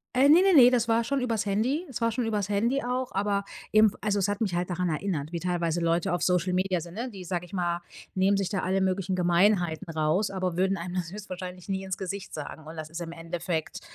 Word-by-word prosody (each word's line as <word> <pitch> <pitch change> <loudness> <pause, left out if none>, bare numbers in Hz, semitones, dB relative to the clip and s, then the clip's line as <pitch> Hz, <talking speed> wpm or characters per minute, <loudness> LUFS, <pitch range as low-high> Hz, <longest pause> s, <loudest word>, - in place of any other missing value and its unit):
Äh, 270 +2 +6
ne, 325 +5 +7
ne, 385 -1 +4
ne, 250 -2 +9
das 240 -2 +2
war 230 +1 +3
schon 270 +3 -1
übers 225 -4 0
Handy 245 - 0
das 245 -3 -6
war 230 0 +2
schon 240 +1 -1
übers 210 -2 -1
Handy 235 +7 +1
auch, 250 +1 -2
aber 200 0 0 0.3
eben 215 -1 +6
also, 205 -1 0
es 195 0 +1
hat 205 +2 -2
mich 190 -5 0
halt 175 0 0
daran 180 0 0
erinnert, 155 -2 -2
wie 170 - -3
teilweise 175 -1 -1
Leute 170 +1 +1
auf 175 - -1
Social 180 0 +2
Media 185 -2 +1
sind, 170 +3 -10
ne? 245 +2 -4
Die, 190 -3 -9
sage 180 0 -3
ich 175 - -17
mal, 175 -2 -1 0.3
nehmen 195 +2 +3
sich 195 -2 0
da 195 - -1
alle 190 +1 +1
möglichen 190 0 0
Gemeinheiten 175 -2 +2
raus, 160 +7 +1
aber 185 -2 -2
würden 190 +1 +2
einem 175 +2 -5
das 175 -1 -2
höchstwahrscheinlich 185 -2 -7
nie 190 0 -1
ins 190 -1 -3
Gesicht 195 +1 -6
sagen. 155 +1 -7
Und 160 +1 -9
das 155 -1 -6
ist 165 +2 -6
im 165 - -5
Endeffekt, 165 -1 -4
190 Hz, 245 wpm, -27 LUFS, 175-210 Hz, 0.3 s, ne